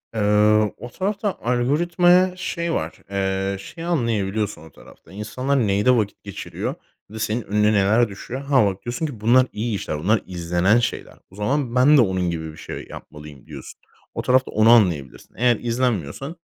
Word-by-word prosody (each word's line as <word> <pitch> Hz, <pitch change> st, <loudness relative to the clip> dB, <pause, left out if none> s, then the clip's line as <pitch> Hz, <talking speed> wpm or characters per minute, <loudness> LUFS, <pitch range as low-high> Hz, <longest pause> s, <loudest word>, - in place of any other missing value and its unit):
Eee, 105 Hz, 0 st, +3 dB
o 120 Hz, -, -9 dB
tarafta 200 Hz, -, -2 dB
algoritmaya 175 Hz, +9 st, +2 dB
şey 170 Hz, -2 st, -3 dB
var. 80 Hz, -, -4 dB
Eee, 95 Hz, 0 st, -1 dB
şey 160 Hz, -, -10 dB
anlayabiliyorsun 110 Hz, -, -1 dB
o 80 Hz, -, -14 dB
tarafta. -, -, -18 dB
İnsanlar 120 Hz, +5 st, -1 dB
nede 105 Hz, +6 st, +3 dB
vakit 105 Hz, -3 st, -3 dB
geçiriyor 100 Hz, -2 st, -5 dB, 0.3 s
ve 110 Hz, +1 st, -8 dB
senin 110 Hz, +2 st, -1 dB
önüne 105 Hz, 0 st, +1 dB
neler 105 Hz, +3 st, +3 dB
düşüyor? 120 Hz, +6 st, -7 dB
Ha, 140 Hz, -4 st, +3 dB
bak, 100 Hz, -1 st, -3 dB
diyorsun 120 Hz, +6 st, -3 dB
ki, 140 Hz, -8 st, -6 dB
"Bunlar 125 Hz, +4 st, +5 dB
iyi 110 Hz, +1 st, -2 dB
işler, 75 Hz, -6 st, -4 dB
bunlar 105 Hz, +7 st, +1 dB
izlenen 90 Hz, +4 st, +1 dB
şeyler. 120 Hz, +1 st, -3 dB, 0.2 s
O -, -, -16 dB
zaman 125 Hz, +4 st, -1 dB
ben 140 Hz, +4 st, +6 dB
de -, -, +7 dB
onun 95 Hz, -4 st, 0 dB
gibi 80 Hz, -2 st, -4 dB
bir 75 Hz, -, -15 dB
şey -, -, -8 dB
yapmalıyım." 75 Hz, -2 st, -12 dB
diyorsun. -, -, -10 dB, 0.3 s
O -, -, -3 dB
tarafta 130 Hz, +1 st, +2 dB
onu 110 Hz, +1 st, +4 dB
anlayabilirsin. 90 Hz, -, +2 dB
Eğer 120 Hz, +1 st, +3 dB
izlenmiyorsan 120 Hz, -, -2 dB
110 Hz, 165 wpm, -22 LUFS, 95-130 Hz, 0.3 s, de